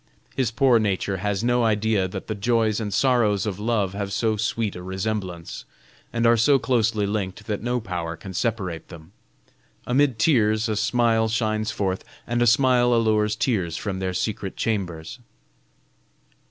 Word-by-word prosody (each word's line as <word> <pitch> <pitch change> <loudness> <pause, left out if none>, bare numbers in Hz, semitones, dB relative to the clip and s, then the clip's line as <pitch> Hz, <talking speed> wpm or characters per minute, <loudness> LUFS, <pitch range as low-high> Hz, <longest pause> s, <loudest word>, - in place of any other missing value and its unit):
His 130 -4 +1
poor 120 +1 +3
nature 100 -2 -1
has 105 +2 -2
no 120 0 +2
idea 110 -3 +1
that 95 +1 -7
the 110 - -3
joys 110 0 +1
and 105 -2 -3
sorrows 105 -3 +2
of 100 -2 -3
love 105 -3 0
have 100 -1 -4
so 110 +2 +1
sweet 110 0 -1
a 90 - -7
resemblance, 95 -2 -4 0.5
and 115 0 0
are 115 0 +6
so 135 +5 +4
closely 115 -5 +1
linked 100 0 -3
that 105 -2 -3
no 120 +2 -1
power 90 -6 -4
can 95 +4 -9
separate 95 -6 -2
them. 80 0 -13 0.7
Amid 130 -1 +2
tears 110 -4 +2
a 110 - -1
smile 115 0 +2
shines 110 -1 0
forth, 95 -3 -2 0.2
and 120 0 -1
a 120 - +4
smile 120 0 +4
allures 110 -2 +2
tears 95 -8 -1
from 95 -1 -4
their 95 -1 -2
secret 100 -2 -3
chambers." 90 -3 -3
110 Hz, 160 wpm, -24 LUFS, 95-115 Hz, 0.7 s, are